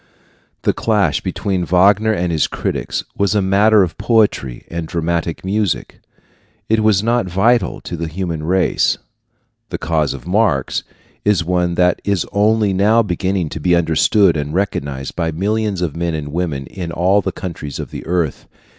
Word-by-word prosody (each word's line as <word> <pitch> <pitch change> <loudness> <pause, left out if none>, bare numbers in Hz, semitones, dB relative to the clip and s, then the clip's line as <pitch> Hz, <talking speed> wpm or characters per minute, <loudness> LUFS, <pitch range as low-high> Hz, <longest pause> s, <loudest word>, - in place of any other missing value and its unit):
The - - +2
clash - - +1
between 95 -3 -2
Wagner 100 +5 +4
and 90 -4 -1
his 80 -2 +1
critics - - -3
was 100 +1 +1
a - - +4
matter 100 +2 +4
of 85 - -4
poetry 105 - +1
and 85 -1 -5
dramatic 85 +1 -2
music. 100 -2 -1 0.7
It 110 0 +2
was 110 -2 +3
not 115 -3 +1
vital 95 +3 +2
to 90 - -6
the 85 0 -4
human 85 -1 -4
race. 90 +4 +1 0.7
The - - -3
cause 80 -4 0
of 65 - -11
Marx 90 - +1 0.4
is 105 -3 +2
one 90 0 0
that 90 0 +2
is 100 -4 0
only 105 0 +2
now 105 +5 +4
beginning 95 -3 -1
to 80 - -6
be 85 +3 +3
understood 85 +3 +3
and 75 +1 -3
recognized 70 -9 -2
by 85 -2 -1
millions 100 +2 -1
of 80 -5 -2
men 85 -1 -1
and 75 -2 -5
women 75 -4 -2
in 90 0 -6
all 90 +4 +2
the - - -2
countries 75 -6 -6
of - - -6
the - - -7
earth. 85 -4 -1
90 Hz, 165 wpm, -18 LUFS, 80-100 Hz, 0.7 s, Wagner